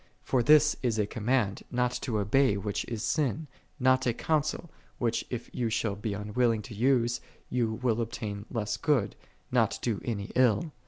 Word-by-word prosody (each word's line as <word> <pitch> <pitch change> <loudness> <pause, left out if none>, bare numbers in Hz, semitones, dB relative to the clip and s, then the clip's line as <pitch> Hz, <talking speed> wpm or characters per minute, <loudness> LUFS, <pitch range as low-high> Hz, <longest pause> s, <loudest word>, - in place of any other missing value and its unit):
For 130 - +1
this 150 +4 +5
is 120 -4 0
a 105 - +2
command, 110 -1 0
not 125 0 +1
to 115 -4 -1
obey 105 +2 +3
which 100 +1 -3
is 110 -2 -4
sin: 155 0 0 0.3
not 130 0 +3
a 120 - +1
counsel, 155 +3 -1 0.3
which 115 -1 0
if 120 -2 -5
you 120 -2 -1
shall 110 -2 -1
be 105 0 -3
unwilling 105 +2 0
to 115 - -9
use, 120 +1 +2 0.3
you 120 -3 +1
will 120 -2 +2
obtain 105 -2 -5
less 105 -3 -2
good, 125 -4 +1 0.4
nol - - +3
do 115 -5 -2
any 105 -4 -3
ill. 130 +4 +3
115 Hz, 170 wpm, -29 LUFS, 105-130 Hz, 0.4 s, this